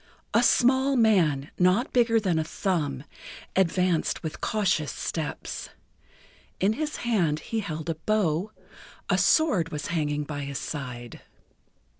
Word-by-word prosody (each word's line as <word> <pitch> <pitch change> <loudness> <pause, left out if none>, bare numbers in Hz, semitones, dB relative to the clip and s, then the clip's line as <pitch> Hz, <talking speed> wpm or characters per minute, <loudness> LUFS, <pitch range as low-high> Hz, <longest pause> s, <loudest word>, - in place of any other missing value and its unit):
A 230 - +5
small 260 +3 +4
man, 175 - +3
not 185 +8 +3
bigger 230 -2 +4
than 180 -6 0
a - - +1
thumb, 155 -6 -2 0.5
advanced 180 -2 +1
with 160 -1 -5
cautious 190 -8 0
steps. 160 -3 -4 0.9
In 200 +3 +3
his 300 +5 -3
hand 175 -10 +1
he 225 - -3
held 160 -6 -5
a 165 - 0
bow; 180 +1 0 0.6
a - - +3
sword 210 - +3
was 150 -2 -5
hanging 150 -2 0
by 145 0 -5
his 140 -1 -4
side. 120 -4 -6
175 Hz, 130 wpm, -26 LUFS, 150-220 Hz, 0.9 s, A